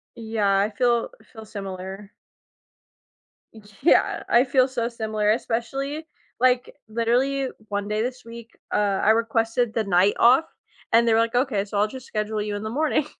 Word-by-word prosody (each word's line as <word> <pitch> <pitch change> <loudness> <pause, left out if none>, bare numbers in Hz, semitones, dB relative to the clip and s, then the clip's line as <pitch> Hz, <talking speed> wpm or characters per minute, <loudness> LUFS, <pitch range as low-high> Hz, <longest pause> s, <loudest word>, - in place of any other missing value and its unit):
Yeah. 215 -4 0
I 210 +2 +1
feel 240 - +1
I - - -21
feel 220 -2 -12
similar. 195 0 -8 1.7
Yeah. 335 - +3
I 240 +2 +5
feel 260 0 +3
so 240 -2 -2
similar, 215 -3 -1
especially, 270 +7 -3 0.3
like, 250 0 +2
literally, 250 +4 0 0.2
one 205 0 -3
day 215 +1 0
this 250 0 -5
week, 230 0 -11 0.2
uh, 200 -2 +1
I 215 - +5
requested 225 +1 +1
the 225 - 0
night 190 +1 +3
off 260 +7 +5 0.5
and 235 +1 +5
they 230 - +3
were 225 - +4
like, 230 +1 0
"Okay. 245 -6 +1
So 205 0 -4
I'll 210 - +3
just 260 +2 -10
schedule 215 0 -2
you 205 -1 -3
in 205 - -6
the 220 - -4
morning." 300 +2 0
225 Hz, 170 wpm, -24 LUFS, 210-250 Hz, 1.7 s, I